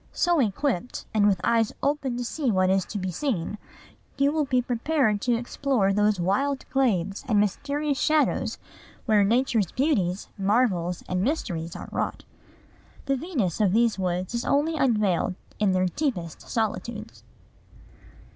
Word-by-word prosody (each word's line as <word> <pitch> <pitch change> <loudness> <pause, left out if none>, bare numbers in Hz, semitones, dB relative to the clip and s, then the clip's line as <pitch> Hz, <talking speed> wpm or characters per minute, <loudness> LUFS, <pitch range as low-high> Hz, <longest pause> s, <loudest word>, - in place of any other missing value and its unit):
So 345 -2 +2
equipped, 245 -1 -1
and 210 -1 +4
with 195 -3 +2
eyes 230 0 +2
open 275 -3 0
to 245 - -2
see 275 +2 -1
what 185 -3 +3
is 190 -1 +2
to 210 - -5
be 185 -1 -3
seen, 205 - -2 0.6
you 280 +1 +3
will 305 -1 0
be 255 -2 +2
prepared 245 -2 0
to 245 -1 +2
explore 240 -3 0
those 210 -1 +2
wild 265 +10 0
glades 200 -7 +1
and 215 -5 +3
mysterious 280 +8 -1
shadows 310 -1 +1 0.5
where 215 -3 +4
Nature's 225 -3 +1
beauties, 210 - 0
marvels, 190 -4 +1
and 180 0 -1
mysteries 175 - -2
are - - -7
wrought. - - -3 0.8
The 275 - +1
Venus 255 - -2
of 195 -3 +3
these 230 -2 +2
woods 180 +2 -2
is 235 - -1
only 305 +3 +1
unveiled 210 - +1 0.2
in 210 -2 +3
their 185 0 +2
deepest 180 - -2
solitudes." 220 0 -3
225 Hz, 145 wpm, -26 LUFS, 190-270 Hz, 0.8 s, and